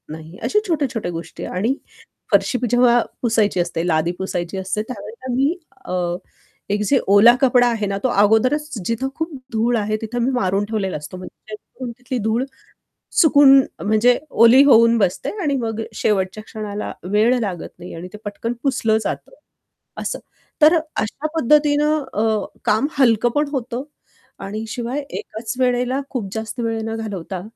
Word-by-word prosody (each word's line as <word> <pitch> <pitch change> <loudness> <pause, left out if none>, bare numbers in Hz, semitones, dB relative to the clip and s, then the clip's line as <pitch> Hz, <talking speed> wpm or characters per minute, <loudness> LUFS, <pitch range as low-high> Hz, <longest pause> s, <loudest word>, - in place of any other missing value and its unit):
नाही. 160 +2 -9
अशा 420 - +1
छोट्या-छोट्या 265 - -1
गोष्टी 165 +1 -7
आणि 220 +9 -1 0.6
फरशी 200 +5 +3
जेव्हा 245 -1 +5 0.2
पुसायची 220 -5 +2
असते, 170 0 -2
लादी 160 +1 +1
पुसायची 180 -1 -3
असते 190 +3 -2
त्यावेळेला 255 +1 -7
मी 280 +7 +1 0.3
अ, - - -5 0.8
एक 205 +1 +1
जे 270 - +4
ओला 205 +4 +7
कपडा 250 -2 +4
आहे 225 -3 -1
ना 195 0 -2
तो 255 - +4
अगोदरच 255 +9 +2
जिथं 230 +4 -1
खूप 320 +1 -3 0.2
धूळ 230 +2 +1
आहे 215 +1 -1
तिथं 230 +2 -4
मी 260 - +1
मारून 195 -4 0
ठेवलेला 205 -4 -2
असतो. 150 +5 -8
म्हणजे 185 +3 -10 0.3
उडून 250 - -4
तिथली 250 0 -4
धूळ 235 +4 +1 0.8
चुकून 285 -4 +7 0.2
म्हणजे 220 +4 +3 0.3
ओली 245 +4 +8
होऊन 230 -3 +6
बसते 190 -4 0
आणि 285 -3 +1
मग 225 0 -3
शेवटच्या 200 0 0
क्षणाला 210 -1 -5 0.2
वेळ 225 +4 +3
लागत 190 -6 -4
नाही 180 - -9
आणि 170 +2 -7
ते - - -7
पटकन 230 +3 -3
पुसलं 225 -5 +2
जातं - - -4 0.7
असं. - - -3 0.4
तर 315 +3 +7
अशा 310 -2 -3
पद्धतीनं 300 +1 +3
अ, 220 0 +1 0.2
काम 220 +7 +2
हलकं 240 -2 +4
पण 295 0 +2
होतं 255 -2 -3 0.6
आणि 210 +3 -5
शिवाय 245 +4 -3
एकाच 220 +2 -6
वेळेला 250 +1 +1
खूप 230 -8 -4
जास्त 220 +1 -5
वेळ 225 -1 -1
न 225 0 -3
घालवता 195 -4 -5
225 Hz, 155 wpm, -20 LUFS, 205-255 Hz, 0.8 s, ओली